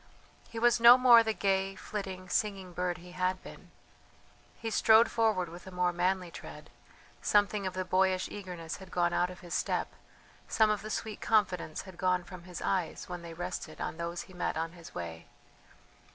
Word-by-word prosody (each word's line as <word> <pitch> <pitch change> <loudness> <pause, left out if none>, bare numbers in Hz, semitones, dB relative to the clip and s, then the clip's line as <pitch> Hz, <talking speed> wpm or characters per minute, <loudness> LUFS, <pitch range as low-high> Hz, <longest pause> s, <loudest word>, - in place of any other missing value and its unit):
He 230 - -9
was 240 +1 +4
no 235 +2 +10
more 245 -2 +8
the 220 -1 0
gay, 195 -2 0
flitting, 190 -2 -6
singing 190 -2 -1
bird 180 0 -1
he 180 0 -13
had 185 +1 -1
been. - - -12 0.9
He 225 -1 -4
strode 220 +2 +5
forward 220 -6 +1
with 175 +3 -11
a - - -8
more 180 -1 +1
manly 180 0 0
tread; - - -10 0.5
something 205 -1 +2
of 185 - -5
the 185 0 -2
boyish 185 0 +2
eagerness 180 -5 -7
had 190 -1 -12
gone 175 -1 +1
out 180 - +2
of 180 - -11
his 175 -2 -8
step, - - 0 0.6
some 220 -1 +3
of 210 - -1
the 215 - -7
sweet 215 0 -4
confidence 190 -7 +1
had 185 -2 -13
gone 180 -1 +1
from 180 -1 -11
his 180 -1 -7
eyes 185 -4 -1
when 180 -1 -6
they 170 -1 -9
rested 175 -2 -5
on - - -4
those 170 0 -4
he 185 - -16
met 180 -3 -2
on 165 +1 -2
his 170 -2 -13
way. 85 -1 -6
185 Hz, 190 wpm, -31 LUFS, 175-205 Hz, 0.9 s, no